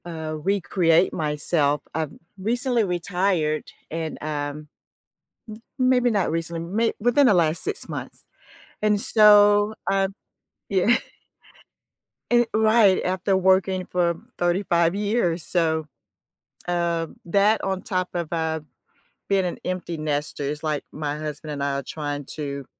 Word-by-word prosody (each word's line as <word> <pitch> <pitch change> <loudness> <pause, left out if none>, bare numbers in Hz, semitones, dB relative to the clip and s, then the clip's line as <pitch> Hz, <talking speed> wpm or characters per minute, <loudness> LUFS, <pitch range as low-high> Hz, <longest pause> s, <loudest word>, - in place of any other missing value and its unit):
uh, 160 -2 -5
recreate 180 -2 +2
myself. 150 -1 0
I've 155 -2 -2 0.3
recently 240 +3 +1
retired 175 -3 0 0.3
and, 160 -1 -4
um 150 0 -4 1.1
m 255 - +4
maybe 250 -1 +3
not 200 -5 +1
recently 165 +1 -3
may 210 +7 0
within 245 +5 +4
the 215 - +5
last 165 -2 +2
6 415 -1 -3
months. - - -7 0.6
And 210 -1 +2
so, 205 -1 +6 0.2
um 195 0 +1 0.6
Yeah. 200 +4 +3 1.4
Eh 240 0 +5
right, 215 -3 +4
after 185 +1 0
working 190 0 +2
for 175 -1 0 0.2
35 175 -1 +1
years, 200 -5 0
so, 160 -3 0 0.8
um, 170 -2 -1
that, 200 +5 +3
on 190 -1 -1
top 185 -1 -2
of, 170 -3 -3
uh, 160 -1 -1 0.7
being 195 -2 +2
an 175 - -3
empty 180 -2 -3
nester, 150 -1 -3
it's 150 +2 -3
like 155 -2 -2
my 150 -1 -3
husband 150 0 -6
and 140 -1 -4
I 140 - 0
are - - -3
trying 145 -1 -5
to 140 -3 -5
175 Hz, 130 wpm, -24 LUFS, 155-200 Hz, 1.4 s, so